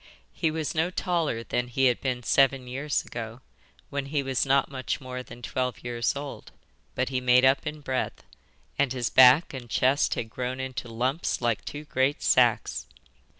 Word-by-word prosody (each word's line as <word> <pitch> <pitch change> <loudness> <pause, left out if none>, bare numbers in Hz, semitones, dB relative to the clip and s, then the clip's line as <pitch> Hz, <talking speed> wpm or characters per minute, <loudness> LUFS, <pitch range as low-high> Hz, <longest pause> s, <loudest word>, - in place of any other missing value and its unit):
He 165 - 0
was 155 -1 -3
no 160 +2 +1
taller 170 -10 -1
than 125 +1 -2
he 135 +2 +1
had 125 -2 +2
been 125 -2 -2
seven 135 +1 +3
years 135 +4 -2
ago, 115 +1 -7 0.5
when 140 -1 -3
he 140 0 -1
was 135 0 0
not 135 +1 +2
much 130 0 -3
more 130 -2 -6
than 120 -1 -12
twelve 125 +1 -3
years 120 0 -1
old, 140 0 -7 0.4
but 130 0 0
he 130 -1 -1
made 125 +1 +5
up 135 +3 +3
in 150 0 -5
breadth, 130 -2 -3 0.6
and 140 -3 +2
his 125 -2 -2
back 130 +6 +7
and 125 -3 -8
chest 130 +5 +2
had 110 -1 -4
grown 125 +2 -4
into 130 -2 -5
lumps 130 +8 -1
like 120 -3 0
two 145 +1 -6
great 135 -1 0
sacks. - - +2
130 Hz, 180 wpm, -27 LUFS, 125-140 Hz, 0.6 s, back